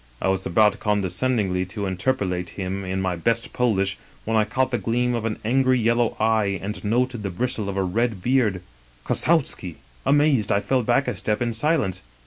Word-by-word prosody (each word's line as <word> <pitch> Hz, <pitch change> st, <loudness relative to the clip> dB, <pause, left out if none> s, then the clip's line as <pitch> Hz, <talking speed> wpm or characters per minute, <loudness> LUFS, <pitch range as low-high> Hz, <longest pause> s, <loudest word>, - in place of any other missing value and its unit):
I -, -, 0 dB
was 95 Hz, 0 st, 0 dB
about 105 Hz, +3 st, +3 dB
con 105 Hz, -2 st, 0 dB
descendingly 95 Hz, -2 st, 0 dB
to 100 Hz, 0 st, -4 dB
interpellate 95 Hz, -3 st, -1 dB
him 95 Hz, 0 st, -3 dB
in 95 Hz, 0 st, -2 dB
my 95 Hz, -1 st, 0 dB
best 115 Hz, +7 st, -1 dB
Polish, 100 Hz, -6 st, 0 dB, 0.3 s
when 115 Hz, -, 0 dB
I 110 Hz, -1 st, +4 dB
caught 130 Hz, +4 st, 0 dB
the 120 Hz, -, 0 dB
gleam 120 Hz, +4 st, 0 dB
of 115 Hz, -2 st, -2 dB
an 110 Hz, -1 st, -2 dB
angry 130 Hz, +2 st, +3 dB
yellow 115 Hz, 0 st, +1 dB
eye 110 Hz, -3 st, +2 dB
and 100 Hz, -1 st, -6 dB
noted 120 Hz, +2 st, 0 dB
the 100 Hz, -, -3 dB
bristle 110 Hz, +2 st, -2 dB
of 100 Hz, -, -4 dB
a 95 Hz, -, +2 dB
red 110 Hz, +3 st, 0 dB
beard 110 Hz, -5 st, +1 dB, 0.2 s
— -, -, -30 dB
Kossowski! 135 Hz, -, 0 dB, 0.2 s
" -, -, -29 dB
Amazed, 145 Hz, -7 st, +3 dB
I 100 Hz, -, +3 dB
fell 125 Hz, +6 st, +1 dB
back 120 Hz, +4 st, +1 dB
a -, -, -1 dB
step 105 Hz, -1 st, -1 dB
in 120 Hz, -1 st, -1 dB
silence. 115 Hz, -, 0 dB
105 Hz, 200 wpm, -23 LUFS, 95-120 Hz, 0.3 s, I